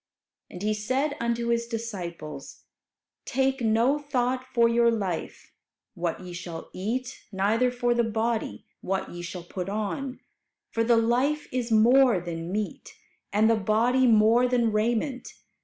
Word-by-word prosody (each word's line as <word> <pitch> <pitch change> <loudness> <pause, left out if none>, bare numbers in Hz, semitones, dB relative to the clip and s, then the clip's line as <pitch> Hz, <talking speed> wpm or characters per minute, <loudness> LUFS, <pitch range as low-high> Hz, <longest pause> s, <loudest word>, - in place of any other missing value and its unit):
And 180 - -8
He 215 +1 +1
said 260 +8 -1
unto 235 0 -1
His 235 0 0
disciples, 175 - -6 0.6
"Take 265 0 0
no 230 +6 +2
thought 255 -3 -1
for 235 -1 +4
your 235 0 +4
life, 195 -7 -3 0.4
what 175 -2 -3
ye 180 -1 -8
shall 175 -1 -7
eat; 245 +7 -3
neither 215 +6 +2
for 245 -1 0
the 240 0 +2
body, 225 0 -2 0.2
what 190 +1 -2
ye 175 - -7
shall 175 0 -6
put 180 +2 -5
on; 220 +6 -3 0.5
for 230 - +1
the 235 0 +4
life 255 +6 +1
is 245 -2 -2
more 235 0 +5
than 170 0 -5
meat, 210 +1 -4 0.4
and 210 +2 +3
the 225 - +4
body 230 +5 +2
more 225 +2 +5
than 240 -2 +2
raiment. 235 +5 -1
230 Hz, 145 wpm, -26 LUFS, 200-245 Hz, 0.6 s, more